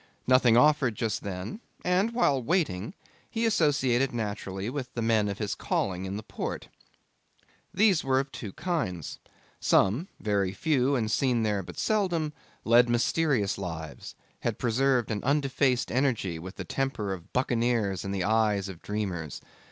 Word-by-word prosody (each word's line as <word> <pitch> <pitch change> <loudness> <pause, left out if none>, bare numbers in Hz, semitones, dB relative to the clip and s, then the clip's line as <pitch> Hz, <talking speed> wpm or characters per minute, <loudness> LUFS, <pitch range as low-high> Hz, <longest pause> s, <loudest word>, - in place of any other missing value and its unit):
Nothing 125 -2 +5
offered 140 -3 +4
just 110 -2 -2
then, 100 - -5 0.3
and, 185 +5 +2
while 145 - +2
waiting, 150 - -1 0.3
he 230 0 -1
associated 140 - +2
naturally 100 -3 -4
with 130 0 -4
the 120 - -1
men 110 -2 +2
of 100 - -4
his 105 -3 -2
calling 95 -1 -2
in 95 +1 -4
the 110 - -6
port. - - -5 1.0
These 200 -5 +3
were 130 -1 +2
of 135 0 -3
two 105 -5 -6
kinds. 140 - -3 0.4
Some, 120 - +3
very 100 -3 0
few 140 0 +1
and 110 -4 0
seen 125 -3 +2
there 105 -2 0
but - - -10
seldom, 175 -8 0 0.3
led 120 +1 +5
mysterious 120 -3 +1
lives, 80 -5 -6 0.2
had - - -2
preserved 125 0 +1
an 105 -2 -2
undefaced 135 -2 +1
energy 120 -10 0
with 95 +3 -8
the 95 - -5
temper 115 -3 -2
of 85 -3 -10
buccaneers 115 -6 0
and 100 - -4
the 95 -2 -1
eyes 105 -2 +2
of 90 -3 -9
dreamers. 95 -7 -3
120 Hz, 150 wpm, -28 LUFS, 100-140 Hz, 1.0 s, Nothing